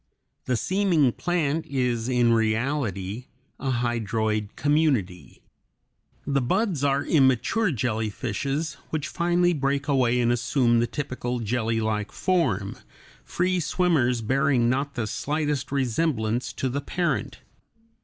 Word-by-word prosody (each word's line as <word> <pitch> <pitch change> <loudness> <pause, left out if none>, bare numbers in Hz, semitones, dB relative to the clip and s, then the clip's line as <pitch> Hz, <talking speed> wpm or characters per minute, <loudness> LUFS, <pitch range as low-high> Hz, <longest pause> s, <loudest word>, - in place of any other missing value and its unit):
The 125 -2 0
seeming 180 - +2
plant 165 0 -1
is 125 -3 -1
in 120 -2 +3
reality 115 -2 -1 0.3
a 135 - -2
hydroid 110 -3 -1
community. 140 - 0 0.8
The 140 -1 +1
buds 180 - 0
are 140 0 +1
immature 150 - +2
jellyfishes 125 +5 -2
which 155 -2 -2
finally 175 0 +1
break 140 -1 -1
away 125 -4 +2
and 120 -1 +2
assume 120 0 +2
the 120 - +1
typical 125 -2 -3
jellylike 110 -2 -1
form, 125 - 0 0.5
free 185 +1 0
swimmers 155 -8 +1
bearing 130 0 +2
not 140 +2 -2
the 120 -3 -1
slightest 145 +3 -2
resemblance 125 -3 0
to 130 - -2
the 135 +3 -2
parent. 170 +4 -2
130 Hz, 115 wpm, -25 LUFS, 115-150 Hz, 0.8 s, in